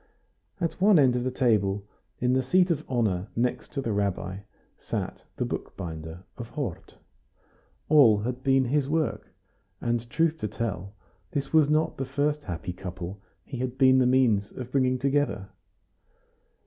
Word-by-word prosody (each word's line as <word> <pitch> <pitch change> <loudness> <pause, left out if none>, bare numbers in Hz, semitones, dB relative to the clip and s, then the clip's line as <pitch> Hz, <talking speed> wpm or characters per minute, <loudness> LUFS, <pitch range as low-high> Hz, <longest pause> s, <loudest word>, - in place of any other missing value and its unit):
At 170 0 -2
one 200 -1 +6
end 130 -4 +5
of 125 - 0
the 130 - 0
table, 105 -6 +1 0.3
in 125 0 +2
the 130 - +3
seat 180 +7 +3
of 155 -2 -1
honor 105 -7 0
next 125 +1 -1
to 140 - -1
the 115 - -1
rabbi, 100 -2 -1 0.4
sat - - -5
the - - -1
bookbinder 80 +1 -6 0.2
of 120 -1 -6
Hort. 135 - -5 0.9
All 125 -9 +6
had 125 +3 -3
been 135 0 +3
his 140 +2 +1
work, 155 0 -1 0.5
and, 120 0 -1
truth 160 +3 +1
to 105 - -2
tell, 100 -3 -4 0.4
this 140 -1 -3
was 155 -2 +5
not 155 +1 +1
the 135 - -2
first 145 +3 -1
happy 90 -1 -4
couple 90 +1 -7 0.2
he 135 - -6
had 130 0 -3
been 130 -1 +6
the 125 - +4
means 120 -6 +3
of 125 -1 -7
bringing 130 -1 +2
together. 140 -7 0
125 Hz, 160 wpm, -27 LUFS, 100-140 Hz, 0.9 s, one